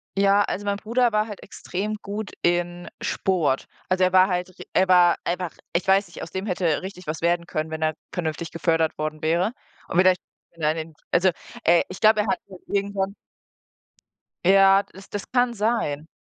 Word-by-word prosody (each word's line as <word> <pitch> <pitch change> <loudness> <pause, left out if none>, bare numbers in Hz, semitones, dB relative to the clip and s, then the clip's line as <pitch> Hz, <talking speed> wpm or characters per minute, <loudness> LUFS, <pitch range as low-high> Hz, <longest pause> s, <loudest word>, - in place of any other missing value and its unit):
Ja, 200 +1 +4
also 205 +1 -4
mein 200 0 0
Bruder 235 +3 +1
war 215 +1 +1
halt 210 - -9
extrem 210 +4 -4
gut 205 +1 -5
in 175 0 0
Sport. 160 -8 0 0.2
Also, 185 0 +2
er 185 0 +2
war 185 0 +7
halt 180 -1 -1
ri - - -10
er 190 0 +3
war 175 -2 +5
einfach 175 0 -2 0.2
ich 180 +3 0
weiß 195 0 +4
nicht, 170 - -9
aus - - -8
dem 190 +2 -4
hätte 175 -5 0
richtig 185 -1 -8
was 160 +1 -3
werden 170 0 +1
können, 155 0 -3
wenn 160 0 -5
er 155 0 +2 0.2
vernünftig 165 -1 -3
gefördert 165 0 +1
worden 155 0 -3
wäre. 170 +7 +1 0.4
Und 180 - 0
vielleicht, 185 0 +5 0.4
wenn 165 - -10
er 150 - +4
an 160 - -4
dem 160 0 -6 0.2
also, 185 +2 +4 0.3
äh, 170 0 +5
ich 185 - -8
glaube, 215 -1 +6
er 210 - -3
hat 240 - 0
halt 185 -2 -12
irgendwann 200 0 -1 1.3
Ja, 195 +1 +6
das 195 0 -15
das 205 - -6
kann 245 -1 +2
sein. 205 -9 -1
185 Hz, 195 wpm, -24 LUFS, 170-200 Hz, 1.3 s, war